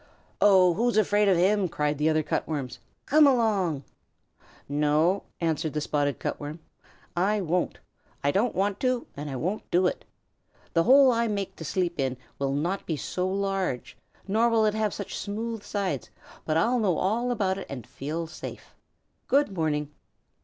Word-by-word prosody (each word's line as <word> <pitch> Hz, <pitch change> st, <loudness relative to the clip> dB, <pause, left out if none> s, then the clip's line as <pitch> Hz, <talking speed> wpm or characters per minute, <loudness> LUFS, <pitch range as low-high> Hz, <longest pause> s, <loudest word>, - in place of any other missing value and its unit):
"Oh, 185 Hz, -3 st, +6 dB
who's 235 Hz, +3 st, +1 dB
afraid 210 Hz, 0 st, +3 dB
of 190 Hz, -3 st, +4 dB
him?" 190 Hz, +1 st, +3 dB
cried 150 Hz, -1 st, -1 dB
the 155 Hz, +1 st, +3 dB
other 155 Hz, 0 st, +2 dB
Cut -, -, -2 dB
Worms. 135 Hz, -6 st, -4 dB, 0.3 s
"Come 300 Hz, +1 st, +6 dB
along!" 205 Hz, -, +2 dB, 0.8 s
"No," 150 Hz, +6 st, +2 dB
answered 160 Hz, -2 st, -1 dB
the 155 Hz, -, 0 dB
Spotted 145 Hz, -1 st, 0 dB
Cut -, -, -3 dB
Worm. 150 Hz, +2 st, -6 dB, 0.6 s
"I 200 Hz, +4 st, +2 dB
won't. 180 Hz, -1 st, -1 dB, 0.5 s
I 140 Hz, -, +3 dB
don't 220 Hz, +9 st, +1 dB
want 195 Hz, +1 st, 0 dB
to 255 Hz, -2 st, 0 dB
and 145 Hz, +1 st, -5 dB
I 135 Hz, -, -4 dB
won't 180 Hz, -, -3 dB
do 180 Hz, +2 st, +3 dB
it. -, -, -1 dB, 0.7 s
The 165 Hz, -1 st, +3 dB
hole 265 Hz, +1 st, +7 dB
I 235 Hz, 0 st, +1 dB
make 200 Hz, -3 st, -3 dB
to -, -, -7 dB
sleep 170 Hz, +1 st, -1 dB
in 130 Hz, -2 st, 0 dB, 0.2 s
will 135 Hz, 0 st, 0 dB
not 170 Hz, +7 st, -2 dB
be 160 Hz, -, -1 dB
so 180 Hz, +6 st, -2 dB
large, 195 Hz, -8 st, -2 dB, 0.3 s
nor 225 Hz, +4 st, +3 dB
will 225 Hz, -1 st, +3 dB
it 210 Hz, -, +2 dB
have 215 Hz, -1 st, 0 dB
such 200 Hz, -, -6 dB
smooth 225 Hz, +2 st, -4 dB
sides, 200 Hz, -2 st, -3 dB, 0.4 s
but 155 Hz, 0 st, +1 dB
I'll 240 Hz, +9 st, +2 dB
know 190 Hz, -7 st, +1 dB
all 230 Hz, +6 st, 0 dB
about 195 Hz, -5 st, 0 dB
it -, -, -8 dB
and 125 Hz, -5 st, -6 dB
feel 155 Hz, +5 st, -4 dB
safe. 160 Hz, -, -9 dB, 0.5 s
Good 280 Hz, -7 st, +2 dB
morning." 150 Hz, -3 st, -1 dB
185 Hz, 175 wpm, -27 LUFS, 155-210 Hz, 0.8 s, hole